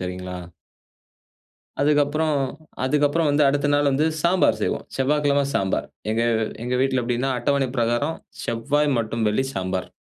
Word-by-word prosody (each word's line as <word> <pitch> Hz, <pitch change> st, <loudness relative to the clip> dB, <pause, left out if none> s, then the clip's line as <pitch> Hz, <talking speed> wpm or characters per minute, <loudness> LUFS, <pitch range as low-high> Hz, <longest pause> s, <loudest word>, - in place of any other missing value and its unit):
சரிங்களா. 90 Hz, 0 st, -5 dB, 1.4 s
அதுக்கப்புறம், 150 Hz, +1 st, +2 dB, 0.5 s
அதுக்கப்புறம் 150 Hz, +3 st, +2 dB
வந்து 145 Hz, +1 st, +3 dB
அடுத்த 145 Hz, +1 st, +1 dB
நாள் 145 Hz, 0 st, +3 dB
வந்து 140 Hz, +3 st, +2 dB, 0.2 s
சாம்பார் 180 Hz, +2 st, +3 dB
செய்வோ. -, -, 0 dB, 0.2 s
செவ்வாய்க்கிழம 140 Hz, +1 st, +2 dB
சாம்பார். 95 Hz, -1 st, 0 dB, 0.2 s
எங்க 115 Hz, +1 st, +1 dB, 0.4 s
எங்க 125 Hz, +1 st, -1 dB
வீட்ல 130 Hz, -2 st, +1 dB
எப்படினா 125 Hz, +2 st, -1 dB
அட்டவணை 140 Hz, +1 st, +1 dB
பிரகாரம் 120 Hz, +7 st, 0 dB, 0.3 s
செவ்வாய் 140 Hz, +4 st, 0 dB
மற்றும் 115 Hz, 0 st, -1 dB
வெள்ளி 130 Hz, +6 st, 0 dB
சாம்பார் 95 Hz, 0 st, -2 dB
135 Hz, 125 wpm, -23 LUFS, 115-145 Hz, 1.4 s, வந்து